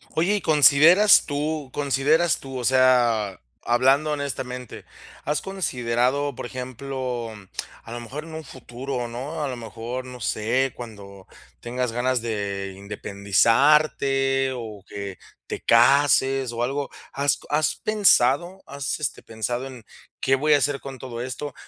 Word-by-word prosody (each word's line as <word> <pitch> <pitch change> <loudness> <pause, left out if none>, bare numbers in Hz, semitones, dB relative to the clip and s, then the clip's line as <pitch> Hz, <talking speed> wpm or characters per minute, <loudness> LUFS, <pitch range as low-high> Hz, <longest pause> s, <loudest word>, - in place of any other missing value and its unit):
Oye, 180 +6 +2
¿y - - -4
consideras 160 +6 +6
tú 150 -1 -2
consideras 145 +4 +2
tú? 135 -1 -8
O 125 - -4
sea, 120 -6 +3 0.2
hablando 135 +5 +3
honestamente, 125 -3 -5 0.4
¿has 150 +1 0
considerado? 135 -6 -1
Por 120 - -6
ejemplo, 125 -2 -5 0.5
a - - -11
lo 120 - -5
mejor 130 +6 -7
en 165 0 -11
un 160 0 -6
futuro, 125 -1 -6
¿no? 135 +7 -5
A - - -1
lo 130 - -4
mejor, 120 +2 -6
no 125 -1 -10
sé, 120 +4 0
cuando 100 -5 -11 0.3
tengas 125 0 -3
ganas 125 +1 0
de 100 -3 -3
independizarte, 135 +7 +2
o 110 -5 -8
que 100 -2 -7 0.3
te - - -6
cases 135 +1 +4
o 120 +1 -2
algo. 140 +3 -2 0.2
¿Has 140 +1 +1
has 150 0 +1
pensado? 185 - +2
¿Has, 140 +1 -4
este, 150 - -3
pensado 120 +4 -4
en 130 -4 -11 0.4
qué 135 - +2
voy 150 +3 +2
a - - +6
hacer 140 0 0
con 135 -1 -8
todo 120 -2 -7
esto? 130 +3 -5
130 Hz, 140 wpm, -24 LUFS, 120-145 Hz, 0.5 s, consideras